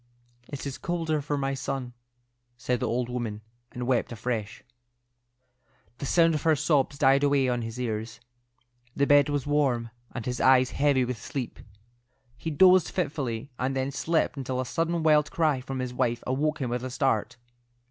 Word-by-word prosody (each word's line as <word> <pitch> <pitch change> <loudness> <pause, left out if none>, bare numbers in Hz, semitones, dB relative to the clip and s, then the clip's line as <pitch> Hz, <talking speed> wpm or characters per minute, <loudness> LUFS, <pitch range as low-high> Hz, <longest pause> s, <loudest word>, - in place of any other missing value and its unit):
"It 140 -1 -7
is 140 -2 -5
colder 165 -3 -1
for 145 +1 -2
my 135 0 -1
son," 135 -2 -4 0.6
said 125 0 -1
the - - -1
old 120 +1 -1
woman, 120 -4 -4 0.3
and 125 0 -5
wept 125 -1 +1
afresh. 115 -2 -4 1.4
The 140 - -4
sound 165 +2 +4
of 150 - -1
her 160 0 +3
sobs 145 -1 +1
died 135 0 +4
away 140 -2 +3
on 120 -1 0
his 115 +1 -6
ears. 110 -2 -3 0.8
The 140 - +2
bed 145 0 +5
was 145 -2 -1
warm, 135 -6 +1 0.2
and 120 -3 -6
his 125 -1 -2
eyes 130 0 +5
heavy 140 -3 +2
with 120 -3 -5
sleep. 130 -4 -5 0.8
He 145 +7 -5
dozed 180 +3 +5
fitfully, 140 -7 -3
and 130 +2 -1
then 135 +1 -1
slept 155 +2 0
until 130 -1 -3
a 130 - -1
sudden 165 +4 -1
wild 150 -2 +4
cry 155 -7 +1
from 135 0 -5
his 125 -1 -3
wife 120 -2 -1
awoke 145 +4 0
him 125 -3 -2
with 125 0 -2
a 130 - -3
start. 125 -4 0
135 Hz, 175 wpm, -27 LUFS, 125-145 Hz, 1.4 s, bed